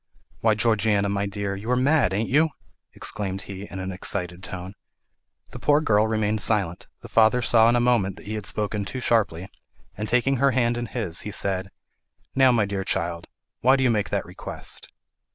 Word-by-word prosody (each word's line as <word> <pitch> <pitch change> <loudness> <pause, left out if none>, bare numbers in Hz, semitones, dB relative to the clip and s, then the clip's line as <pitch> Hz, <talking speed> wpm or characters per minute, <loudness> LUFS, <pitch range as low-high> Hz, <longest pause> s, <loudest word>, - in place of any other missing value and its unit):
"Why, 110 -1 +3
Georgiana, 110 -2 +2
my 100 0 -1
dear, 100 0 -3
you 105 +4 -7
are 125 - +3
mad, 130 -4 +3
ain't 105 +4 -1
you?" 155 +4 +3 0.5
exclaimed 100 -2 -3
he, 100 +1 -8
in 95 - -7
an 95 0 -4
excited 90 -1 -4
tone. 95 0 -7 0.8
The - - -8
poor 145 0 +4
girl 110 -7 +3
remained 110 -1 0
silent; 100 -6 0
the - - -10
father 115 +2 +4
saw 115 0 +5
in 120 - +3
a - - +3
moment 120 -6 +2
that - - -14
he 105 - -5
had 105 -2 -4
spoken 105 -1 -2
too 130 +6 -5
sharply; 100 -8 +1 0.5
and 105 +1 -4
taking 130 +2 +2
her 140 +3 +4
hand 120 -1 +2
in 120 0 -3
his 95 -9 -3
he - - -5
said, 95 -1 -1 0.6
"Now, 130 -1 +5
my 115 -4 +2
child, 90 -4 -2 0.3
why 130 +2 +5
do 135 - +1
you 125 - +4
make 105 -2 0
that - - -1
request?" - - -6
105 Hz, 190 wpm, -24 LUFS, 95-120 Hz, 0.8 s, saw